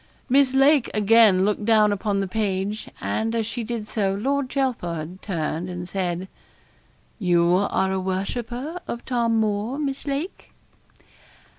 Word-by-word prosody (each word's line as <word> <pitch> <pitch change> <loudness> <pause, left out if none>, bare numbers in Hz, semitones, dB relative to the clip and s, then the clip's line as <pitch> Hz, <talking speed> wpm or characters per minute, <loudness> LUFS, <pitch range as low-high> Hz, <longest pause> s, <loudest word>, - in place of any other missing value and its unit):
Miss 265 0 +4
Lake 275 0 +4
again 210 -3 +5
looked 210 0 0
down 215 -1 +4
upon 200 0 0
the 195 - -2
page, 205 0 -2
and 225 +1 -1
as 225 -1 0
she 230 +2 -4
did 225 -1 -4
so, 195 -3 0
Lord 270 +5 -1
Chelford 180 - -2
turned 170 -1 -3
and 175 -1 -5
said 180 -1 -2 0.9
'You 175 -3 +3 0.2
are 190 0 +1
a 190 - 0
worshipper 240 - -3
of 235 - -5
Tom 235 -3 +1
Moore, 215 +4 -1
Miss 280 -1 -3
Lake?' 285 +7 -4
215 Hz, 140 wpm, -24 LUFS, 190-245 Hz, 0.9 s, again